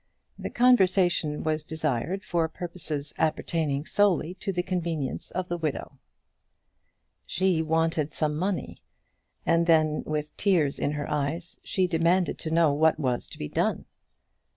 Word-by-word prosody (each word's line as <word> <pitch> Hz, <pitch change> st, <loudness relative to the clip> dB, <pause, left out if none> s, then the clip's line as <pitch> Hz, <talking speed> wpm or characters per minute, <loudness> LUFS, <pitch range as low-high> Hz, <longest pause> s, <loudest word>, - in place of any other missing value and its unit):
The -, -, -4 dB
conversation 185 Hz, -10 st, +3 dB
was 155 Hz, -1 st, 0 dB
desired 160 Hz, -, -2 dB
for 170 Hz, -2 st, 0 dB
purposes 160 Hz, -5 st, -5 dB
appertaining 155 Hz, -2 st, 0 dB
solely 185 Hz, -4 st, +2 dB
to 200 Hz, -, -2 dB
the 180 Hz, -1 st, -1 dB
convenience 170 Hz, -6 st, -3 dB
of 185 Hz, 0 st, -3 dB
the 175 Hz, -, -2 dB
widow. 145 Hz, -3 st, -4 dB, 1.3 s
She 185 Hz, -3 st, +1 dB
wanted 160 Hz, -1 st, +1 dB
some 150 Hz, -1 st, -1 dB
money, 185 Hz, +3 st, -3 dB, 0.6 s
and 170 Hz, 0 st, +3 dB
then, 155 Hz, -2 st, +3 dB
with 150 Hz, 0 st, -3 dB
tears 165 Hz, -9 st, +2 dB
in 145 Hz, -, 0 dB
her 145 Hz, -1 st, -3 dB
eyes, 150 Hz, +4 st, -2 dB
she 185 Hz, -, +1 dB
demanded 175 Hz, +1 st, +1 dB
to 160 Hz, -, -4 dB
know 160 Hz, -2 st, +3 dB
what 160 Hz, +2 st, +3 dB
was 125 Hz, -4 st, -1 dB
to -, -, -12 dB
be 75 Hz, -, -4 dB
done. -, -, -1 dB
160 Hz, 140 wpm, -27 LUFS, 150-180 Hz, 1.3 s, conversation